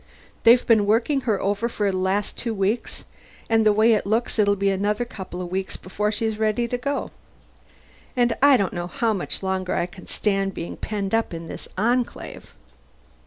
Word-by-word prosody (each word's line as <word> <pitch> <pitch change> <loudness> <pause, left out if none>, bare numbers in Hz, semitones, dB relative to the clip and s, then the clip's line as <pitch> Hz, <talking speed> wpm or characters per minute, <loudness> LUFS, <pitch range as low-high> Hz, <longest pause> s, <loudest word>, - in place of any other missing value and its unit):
They've 240 +2 +7
been 215 -3 +4
working 240 +6 +2
her 205 - +2
over 205 +4 0
for 205 -3 0
the - - -3
last 190 +2 -1
two 230 -2 -3
weeks, 200 +4 -2 0.5
and 225 0 +4
the 215 - +5
way 220 +2 +4
it 210 -2 0
looks 225 +2 0
it'll 205 -1 +4
be 200 0 +1
another 205 +4 0
couple 185 -5 -7
of 175 - -7
weeks 190 0 -3
before 210 +3 -2
she's 220 0 -2
ready 220 +2 +1
to 245 - -1
go. 280 +3 -2 1.1
And 240 -1 +3
I 280 -1 +7
don't 195 -5 -1
know 175 0 -3
how 225 +5 0
much 195 0 -2
longer 190 -1 -1
I - - +1
can 180 +1 -13
stand 195 -2 -1
being 170 - -5
penned 205 -2 -4
up 225 -6 +1
in 165 0 -7
this - - -8
Enclave." 240 +4 -1
210 Hz, 190 wpm, -23 LUFS, 195-230 Hz, 1.1 s, They've